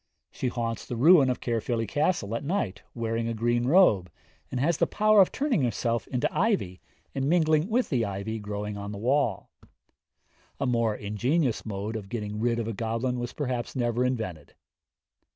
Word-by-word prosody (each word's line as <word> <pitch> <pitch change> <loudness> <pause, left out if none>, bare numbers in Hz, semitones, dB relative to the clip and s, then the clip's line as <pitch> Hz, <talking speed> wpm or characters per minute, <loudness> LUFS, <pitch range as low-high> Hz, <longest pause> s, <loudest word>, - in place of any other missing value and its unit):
She 130 - -3
haunts 115 -2 -3
the 120 - -4
ruin 145 +2 +6
of 125 - -1
Caerphilly 115 0 -1
Castle 145 - 0
at 115 - -2
night, 140 - -2
wearing 115 0 -2
a 115 - -2
green 120 +2 +1
robe, 130 - +5 0.4
and 130 - -3
has 155 +4 +2
the - - +3
power 215 -1 +5
of 185 - +3
turning 275 - 0
herself 115 -1 -1
into 130 +3 0
ivy 185 - 0 0.3
and 135 0 -1
mingling 160 0 +3
with 245 +3 +1
the 125 -6 +1
ivy 100 +2 -3
growing 105 0 -5
on 100 0 -6
the 105 - -6
wall. 120 -2 0 1.1
A 140 - 0
more 115 -3 +1
ingenious 120 +7 -1
mode 105 +2 -4
of 100 -3 -6
getting 105 -2 -4
rid 115 +1 +1
of 115 -2 -2
a 115 - -2
goblin 115 +4 -2
was 120 0 -4
perhaps 125 -4 -3
never 120 -1 0
invented. 110 - -3
120 Hz, 175 wpm, -27 LUFS, 110-140 Hz, 1.1 s, ruin